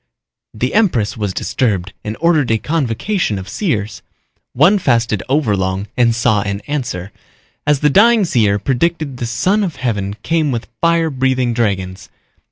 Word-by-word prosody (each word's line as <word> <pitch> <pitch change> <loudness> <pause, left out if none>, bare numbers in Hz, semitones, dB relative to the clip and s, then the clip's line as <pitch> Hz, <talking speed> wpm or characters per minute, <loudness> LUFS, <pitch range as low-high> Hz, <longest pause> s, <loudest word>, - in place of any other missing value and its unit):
The 125 +4 -2
empress 170 - +2
was 105 -3 -2
disturbed 100 -3 -1
and 105 +1 -5
ordered 160 -5 +2
a 110 - +3
convocation 145 - -1
of 95 0 -7
seers. 110 - -2 0.5
One 175 +11 +4
fasted 115 - +1
overlong 100 -8 0
and 115 -2 +3
saw 115 -3 +2
an 100 0 -3
answer. 105 -7 -4 0.6
As 145 -2 +2
the 150 - +4
dying 225 +3 +5
seer 110 - +2
predicted 140 - -1
the 120 - -3
Son 185 - +1
of 175 -6 -3
Heaven 105 -6 -2
came 160 -2 +1
with 120 -2 -4
fire 165 -1 +2
breathing 130 -2 0
dragons. 95 -5 -2
120 Hz, 150 wpm, -17 LUFS, 105-155 Hz, 0.6 s, dying